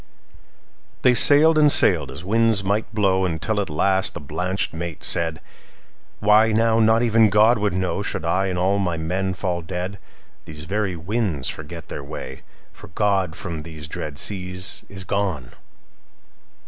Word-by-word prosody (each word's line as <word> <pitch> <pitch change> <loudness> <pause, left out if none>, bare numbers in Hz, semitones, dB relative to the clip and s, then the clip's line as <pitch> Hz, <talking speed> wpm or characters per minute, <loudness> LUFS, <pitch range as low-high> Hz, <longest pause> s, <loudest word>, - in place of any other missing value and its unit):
'"They 125 - +5
sailed 155 +5 +6
and 150 -1 +5
sailed, - - +4
as 90 - -9
winds 110 0 +2
might 105 +3 -1
blow, 95 -3 +1
Until 95 +5 -1
at 95 - -5
last 95 +5 0
the - - -5
blanched 90 +7 -3
mate 85 -2 -6
said:"Why, 105 +6 -1
now 115 +1 +2
not 110 +1 +3
even 115 -2 +4
God 110 +3 +4
would 105 -3 0
knowShould 90 -3 -3
I 95 +4 +1
and 90 -1 -3
all 95 +3 +1
my 90 -4 -1
men 95 +3 -2
fall 90 -1 -3
dead. 90 +3 -5 0.5
These 75 -2 -9
very 95 +2 -2
winds 85 - -2
forget 80 +1 -9
their 70 - -6
way, 70 -2 -8 0.3
For - - -14
God 95 -2 0
from 80 -1 -6
these 80 -1 -9
dread 75 -2 -6
seas 90 -1 -1
is 95 -1 -7
gone. 90 -10 -3
95 Hz, 150 wpm, -22 LUFS, 85-105 Hz, 0.5 s, sailed